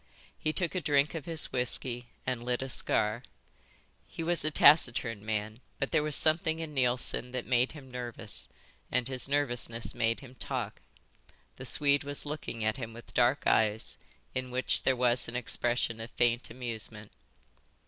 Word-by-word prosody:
He 155 - 0
took 170 +1 -1
a 185 - -1
drink 145 -1 +2
of 160 -4 -5
his 165 -2 +3
whisky 125 -1 +1 0.2
and 125 -2 -2
lit 125 +1 -1
a 135 - -5
cigar. 110 -1 +1 0.9
He 165 - -6
was 170 -1 0
a 155 - +1
taciturn 135 -8 +4
man, 110 +1 -3 0.2
but 135 - -2
there - - +3
was 150 -1 +1
something 160 0 +3
in 160 -2 -6
Neilson 125 -1 0
that 125 - -3
made 125 +1 +2
him 135 -4 -12
nervous, 120 -3 -6 0.4
and 125 -1 +1
his 130 0 -2
nervousness 120 -5 -1
made 115 +2 0
him 130 -2 -12
talk. - - -4 0.8
The - - -8
Swede 140 -1 +3
was 145 +1 -3
looking 145 -6 -5
at 110 +4 +1
him 115 -3 -6
with 120 +1 -12
large - - -16
dark 125 +3 +3
eyes 110 0 +1 0.3
in 130 0 -3
which 130 +1 0
there 130 - +2
was 120 0 +2
an 115 - -6
expression 120 -1 0
of 115 +1 -6
faint 120 0 +1
amusement. 110 -3 +1
125 Hz, 170 wpm, -30 LUFS, 115-145 Hz, 0.9 s, taciturn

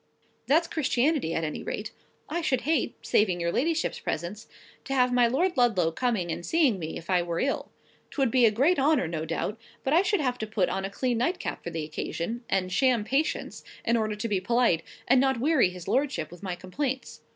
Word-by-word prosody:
That's 325 +4 +4
Christianity, 280 - +1
at 165 - -1
any 155 -1 -3
rate. - - -4 0.4
I 345 - -2
should 265 -6 +1
hate—saving 220 - +1
your 170 0 0
ladyship's 325 - 0
presence—to 205 - -6
have 250 -1 +3
my 245 -1 +5
Lord 340 +10 +1
Ludlow 210 - +3
coming 205 -4 -1
and 170 - -4
seeing 280 - +2
me, 160 -1 -5
if 170 - -10
I 180 -2 +3
were 170 -1 -3
ill. 275 - -1 0.4
'Twould 270 -5 0
be 245 -2 +5
a - - +6
great 275 +11 +2
honour, 275 - +3
no 160 -1 -3
doubt; 180 +7 -3 0.2
but 270 - 0
I 335 - +6
should 400 0 +1
have 250 -4 -1
to 220 - -3
put 210 -4 0
on 195 0 -2
a - - -3
clean 240 +3 -1
nightcap 350 +9 -2
for - - -4
the 160 -2 -4
occasion; 170 +9 -4
and 185 -1 0
sham 255 -3 +3
patience, 275 +8 -1 0.2
in 235 - +3
order 215 -2 0
to 210 +2 -3
be 200 -4 0
polite, 235 -4 +2 0.3
and 255 +1 +5
not 265 -3 +2
weary 280 - +3
his 180 -1 -10
lordship 265 - 0
with 175 - -12
my 185 -3 -3
complaints. 260 +9 -4
235 Hz, 205 wpm, -27 LUFS, 180-270 Hz, 0.4 s, a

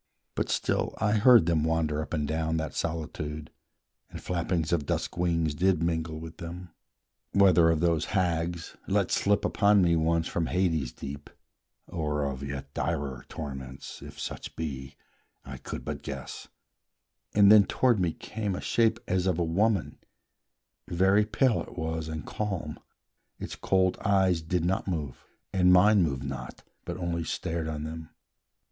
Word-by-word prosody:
But - - -2
still - - 0
I 105 -1 +1
heard 115 -2 +6
them 80 -3 +2
wander 80 -2 0
up - - -7
and 75 -3 -1
down 80 +1 -1
That 80 -1 -3
solitude, 75 -2 -4 0.6
and - - -8
flappings 85 -2 -1
of 75 -4 0
dusk - - -2
wings 85 -3 +1
Did 90 +1 +2
mingle 80 -1 -1
with 80 0 -9
them, 85 0 -8 0.6
whether 90 -4 +6
of 80 -1 +1
those 85 -3 +2
hags 85 -2 -1
Let - - +1
slip 100 0 +2
upon 100 -1 +4
me 85 -1 +3
once 80 0 +1
from 85 -1 -1
Hades 80 -9 0
deep, 70 +1 -8 0.6
Or 75 -4 -2
of 70 -1 -4
yet 70 0 -6
direr 70 -4 -3
torments, 65 -3 -7
if - - -10
such - - -6
be, 70 -4 -5 0.5
I - - -7
could - - -7
but - - -4
guess; - - -7 0.9
and 100 -1 +7
then 105 -2 +8
toward 120 -1 +2
me 90 -3 +1
came 105 -3 -4
A - - -4
shape 115 -1 +2
as 90 0 +1
of 90 -3 +1
a 85 - +1
woman: 95 +3 0 0.9
very 95 +4 +3
pale 130 -4 +2
It - - -10
was, 80 -1 -3
and 80 -3 -5
calm; 95 -8 -4 0.6
its - - -6
cold 95 -1 +1
eyes 95 -4 +3
did 85 +1 -1
not 95 +2 0
move, 75 -8 -4 0.3
And 90 -1 +4
mine 100 +3 +6
moved 70 -5 0
not, 70 -1 -7 0.2
but - - -4
only 85 -2 -2
stared 80 0 -3
on 75 -1 -4
them. 80 0 -7
85 Hz, 160 wpm, -28 LUFS, 80-95 Hz, 0.9 s, then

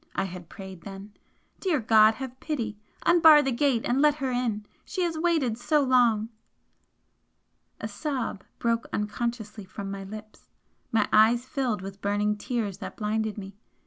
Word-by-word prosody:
I - - +1
had 180 -3 -7
prayed 190 -3 -10
then 195 +2 -10 0.5
"Dear 350 -7 +1
God, 220 -1 +5
have 260 +1 -7
pity! 230 -9 -3 0.3
Unbar 320 -3 +7
the 270 - 0
gate 245 -2 +1
and 255 +3 +1
let 300 -1 +5
her 270 -3 -2
in! 235 -4 -1 0.2
She 370 - -3
has 340 -2 -1
waited 315 -9 +1
so 295 +4 +2
long!" 240 -4 +3 1.5
A - - -4
sob 230 -3 -4
broke 230 0 0
unconsciously 215 0 -3
from 195 +1 -7
my 195 0 -5
lips 215 +2 -11 0.4
my 220 -2 +2
eyes 230 +3 +5
filled 255 -8 -2
with 195 +1 -8
burning 205 +1 +1
tears 210 -3 -3
that 200 - -7
blinded 215 0 -1
me. 200 0 -9
220 Hz, 155 wpm, -27 LUFS, 205-260 Hz, 1.5 s, Unbar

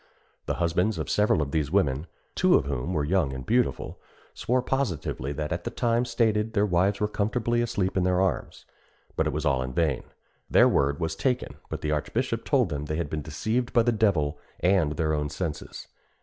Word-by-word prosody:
The - - 0
husbands 90 +5 +1
of - - -3
several 105 -7 +3
of 70 - -6
these 75 -2 0
women 70 +5 +1 0.3
(two - - +4
of - - +3
whom 70 +3 -3
were 75 -5 0
young 80 -3 +1
and 65 -1 -6
beautiful) 125 +2 0 0.3
swore 125 +1 0
positively 95 - -2
that 75 +2 -4
at 85 0 -2
the - - -2
time 120 0 +1
stated 110 -2 +1
their 105 -2 +3
wives 95 +1 +2
were 105 - +1
comfortably 115 +3 0
asleep 105 -6 -1
in 95 - +2
their 90 0 +2
arms; 95 0 -1 0.5
but - - +1
it - - 0
was 75 +3 -3
all 65 -3 +2
in 65 0 -4
vain. 70 -4 +1 0.5
Their - - +6
word 70 +3 +1
was 80 -1 -2
taken, 125 -2 -1
but - - -5
the 75 - -1
archbishop 75 -1 -1
told - - +2
them 75 0 -3
they 75 - -3
had 80 -3 -3
been 75 - -2
deceived 110 - -2
by 120 - +5
the 120 - +2
devil 85 -10 +1 0.2
and 90 -5 +2
their 80 -1 0
own 75 -1 -1
senses. 80 -1 -5
85 Hz, 205 wpm, -26 LUFS, 75-110 Hz, 0.5 s, Their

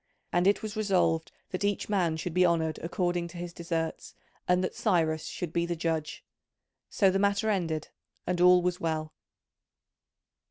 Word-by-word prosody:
And 175 +2 +3
it 205 - +3
was 215 0 -5
resolved 175 -6 +1 0.2
that 185 +2 -3
each 205 -1 0
man 175 -6 +1
should 165 +1 -4
be 180 +1 +4
honoured 165 -3 +1
according 175 0 -1
to 175 - -11
his 175 0 -6
deserts 165 -1 -4 0.3
and 180 +1 +3
that 185 - -2
Cyrus 160 -6 +1
should 170 -2 -5
be 170 0 0
the 175 - -1
judge. 160 -2 -2 0.7
So 195 -2 +3
the 195 - +1
matter 200 +2 +2
ended, 165 -6 -2 0.4
and 180 -1 -1
all 180 0 +7
was 180 0 0
well. 155 -1 -2
175 Hz, 165 wpm, -29 LUFS, 165-185 Hz, 0.7 s, all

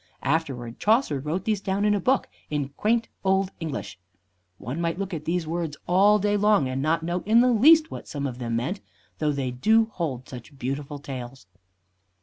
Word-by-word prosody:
Afterward 135 -6 -2
Chaucer 215 - +2
wrote 155 +7 -3
these 215 -3 0
down 200 +1 0
in 210 - +4
a 205 - +1
book 260 +8 +1 0.2
in 145 -2 -2
quaint 225 +10 0 0.2
old 190 0 +2
English. 150 - -5 0.6
One 130 +11 -5
might 165 0 -1
look 195 -1 -4
at 155 -2 -5
these 170 0 -1
words 165 -2 -3
all 200 +4 +5
day 205 0 +1
long 205 -8 +3
and 130 +1 -2
not 160 +3 +1
know 175 +2 -2
in 230 +2 +6
the 250 - +4
least 310 +7 +6
what - - -4
what - - -18
some 140 -1 -4
of 125 -2 -4
them 115 -2 -2
meant, 150 - -2 0.4
though 150 -1 +1
they 135 -3 -2
do 220 - +3
hold 135 -8 -3
such 125 +2 -11
beautiful 140 +3 -4
tales. 130 -4 -8
165 Hz, 195 wpm, -25 LUFS, 135-205 Hz, 0.6 s, in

